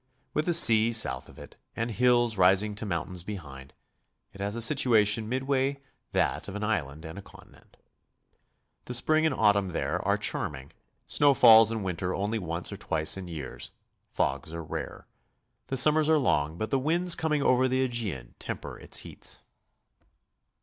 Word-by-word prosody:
With 150 - -1
the 175 - +2
sea 115 -3 +6
south 110 - 0
of - - -16
it, - - -13 0.2
and 115 +1 -3
hills 120 0 +2
rising 95 +3 +3
to 105 +1 -5
mountains 90 -1 -3
behind, 70 -10 -9 0.6
it 100 - -11
has 100 +2 -3
a - - -4
situation 110 -2 +2
midway 135 +2 -1 0.3
that - - -1
of 100 - -8
an 105 - -4
island 80 -8 -3
and 80 +5 -8
a - - -9
continent. 95 - -19 1.1
The 125 - -2
spring 155 +6 +2
and - - -2
autumn 100 -4 +2
there - - -2
are - - +1
charming; 65 -1 -4 0.3
snow 145 -1 +3
falls 110 -2 +7
in 110 -2 -3
winter 90 0 -3
only 105 +3 -2
once 85 -2 -3
or - - -7
twice 80 0 +1
in 95 -2 -7
years; 80 -6 -6 0.4
fogs 70 +3 -2
are 85 - -6
rare. - - -7 0.6
The 135 - -3
summers 155 +4 +4
are 160 - +4
long, 80 - 0
but 110 - -4
the 135 - +1
winds 170 +5 +2
coming 150 -3 -1
over 130 0 +3
the 130 +1 0
Aegean 105 - -4
temper - - -7
its - - -1
heats. - - -4
110 Hz, 170 wpm, -27 LUFS, 90-130 Hz, 1.1 s, falls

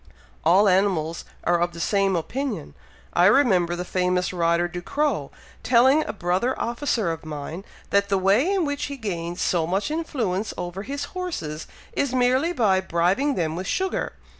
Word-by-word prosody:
"All 185 +6 +5
animals 180 -4 +1 0.2
are 175 0 +2
of 175 0 0
the 170 - -9
same 195 +2 +1
opinion. 210 - -3 0.4
I 175 +1 +5
remember 190 -8 +4
the 180 +1 -4
famous 180 0 0
rider, 170 0 +2
Ducrow, 180 - -2 0.3
telling 260 +5 +4
a - - -3
brother 190 +6 -1
officer 235 - -1
of 165 - -6
mine, 155 +3 -6 0.3
that 200 0 +2
the 195 - +2
way 200 - +3
in 385 -4 +1
which 285 -1 -2
he 280 -1 -6
gains 175 -6 -4
so 165 -3 +1
much 195 - -1
influence 230 - -2
over 175 +2 -5
his 280 +6 -4
horses, 245 - -4 0.3
is 265 -2 0
merely 255 +6 +2
by 210 - +2
bribing 190 - +1
them 160 -2 -1
with 185 +2 -4
sugar. 380 0 -1
195 Hz, 165 wpm, -24 LUFS, 175-260 Hz, 0.4 s, All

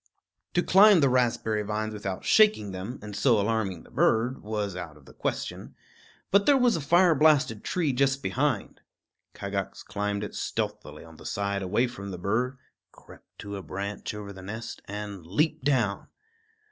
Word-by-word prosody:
To 175 - +3
climb 200 0 +7
the 140 - +4
raspberry 115 -4 +1
vines 110 +1 -3
without 100 -3 -5
shaking 210 - +4
them, 95 +7 -6
and 105 -1 -7
so 115 +1 +3
alarming 100 -4 -1
the - - -19
bird, 120 +4 +2
was 105 -3 -3
out 85 -4 -7
of 70 - -20
the - - -15
question; - - -4 0.6
but 200 +1 +4
there 285 - +6
was 245 -2 +3
a 165 - -2
fire 170 +4 +5
blasted 150 -7 +3
tree 160 -7 0
just 135 +1 +1
behind. 130 -5 -1 0.5
Kagax 100 -1 -4
climbed 105 0 -3
it 105 - -6
stealthily - - -4
on 80 -1 -14
the - - -14
side 100 0 -2
away 105 +6 +1
from 110 -5 -7
the 90 - -6
bird, 120 +8 -1 0.3
crept - - -18
to 100 0 -6
a - - -6
branch 100 +3 -5
over 100 -1 -7
the 95 - -11
nest, 110 +4 -7
and 105 -2 -6
leaped 130 - 0
down. 120 -8 +1
105 Hz, 170 wpm, -27 LUFS, 100-135 Hz, 0.6 s, climb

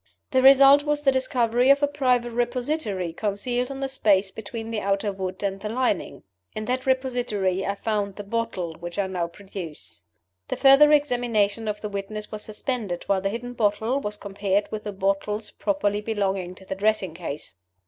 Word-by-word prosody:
The 260 - +4
result 275 +1 +8
was 295 0 -1
the 275 - +5
discovery 250 -2 +2
of 280 +1 +5
a - - +5
private 250 -4 +1
repository 240 - -1
concealed 235 +6 -2
in 275 0 -6
the 270 - 0
space 205 -7 +2
between 225 +2 -7
the 225 - -1
outer 200 +1 0
wood 190 0 -5
and 195 -1 -1
the 210 +1 -5
lining. 240 -4 -1 0.3
In 215 - -4
that 255 +2 -2
repository 245 -8 0
I 200 - -1
found 205 -2 -2
the 205 - -6
bottle 200 -5 -3
which 175 +2 -7
I 200 - +1
now 180 -3 -2
produce." 175 - -8 0.5
The - - -2
further 275 +2 +7
examination 235 -7 +2
of 210 0 -3
the 210 - -4
witness 205 +1 -5
was 215 - -5
suspended 215 -4 -4
while 195 -1 +1
the 195 - 0
hidden 240 +3 -5
bottle 220 +3 +1
was 210 -5 -4
compared 200 0 -1
with 215 -1 -5
the 210 - -3
bottles 195 +2 -1
properly 210 -9 0
belonging 195 -4 -2
to 190 - -15
the - - -3
dressing 195 -3 0
case. 150 - -6
210 Hz, 180 wpm, -25 LUFS, 195-250 Hz, 0.5 s, result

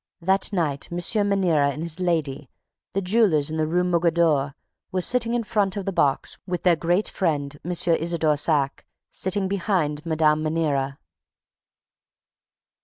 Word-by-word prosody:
That 190 +4 +2
night, 160 -8 -2
M. 175 - -3 0.3
Maniera 170 -8 +2
and 150 +3 -6
his 170 +1 -3
lady, 150 -7 -2 0.4
the 195 - -1
jewelers 180 -7 +2
in 160 - -3
the 155 -1 0
Rue 175 +3 +1
Mogador, 165 -5 +1 0.4
were 185 - -1
sitting 235 +3 +1
in 240 - +1
the 220 - -11
front 205 -2 0
of 195 - -4
the 195 - -1
box, 140 -5 0
with 180 -1 -3
their 180 -2 +4
great 175 +5 0
friend, 145 -6 -1
M. 175 - -6
Isidore 165 -2 +1
Saack, 145 -2 0 0.3
sitting 190 +1 -1
behind 175 -6 -1
Mme. 155 -2 +2
Maniera. 150 -4 -1
170 Hz, 150 wpm, -23 LUFS, 150-185 Hz, 0.4 s, their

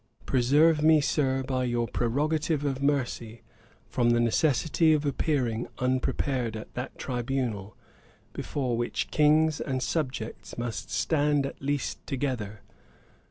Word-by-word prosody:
Preserve 150 +5 +4
me, 155 0 +6
Sir, 135 -2 +1
by 130 -1 -1
your 120 -1 0
prerogative 150 +6 0
of 135 -1 -1
mercy, 120 -5 -1 0.4
from 120 -1 +1
the 120 0 +3
necessity 155 +6 +3
of 150 -1 +1
appearing 130 -5 0
unprepared 125 -1 0
at 110 - -10
that 125 +1 -6
tribunal, 120 -5 -3 0.6
before 130 -4 -2
which 120 +1 -2
Kings 155 +1 +3
and 130 -2 -2
Subjects 130 -5 -3
must 120 -1 -4
stand 145 -2 +1
at 135 - -7
last 140 0 -2
together. 125 -7 -3
130 Hz, 120 wpm, -28 LUFS, 120-150 Hz, 0.6 s, me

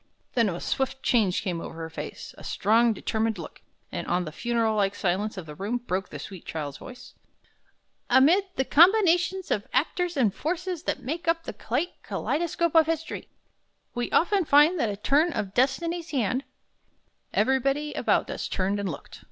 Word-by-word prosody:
Then 230 -4 +3
a 175 -1 -4
swift 265 0 -2
change 210 -7 +2
came 175 -5 -2
over - - -7
her 165 0 -6
face, 150 -1 -7
a - - -13
strong, 225 +4 +3
determined 220 0 -1
look; 170 - -9 0.3
and - - -4
on 180 +1 0
the 155 - -6
funeral 230 +4 0
like 200 -1 +1
silence 200 +3 -1
of 185 - -6
the 150 - -9
room 205 +10 -2
broke 190 -6 -3
the - - -7
sweet 190 -4 -9
child 145 -3 -5
voice: 250 0 -11 1.0
"'Amid 305 +10 +5
the 265 - 0
combinations 355 +2 +4
of 205 - 0
actors 340 +5 0
and 225 -7 +3
forces 355 - -3
that 270 - -2
make 330 +7 -4
up 330 0 +2
the - - -6
great 355 - -3
kaleidoscope 340 +1 -1
of 320 -2 +6
history, 325 0 -3 0.6
we 240 -1 -2
often 390 +2 +3
find 300 +3 +5
that 230 - +1
a 200 - -4
turn 295 +9 +2
of 195 -6 -3
Destiny's 330 +7 0
hand 255 -1 0 0.5
'" - - -45
Everybody 275 +3 +1
about - - +1
us - - -4
turned 195 +2 -1
and 200 -2 -2
looked. 140 - -8
255 Hz, 175 wpm, -26 LUFS, 200-330 Hz, 1.0 s, of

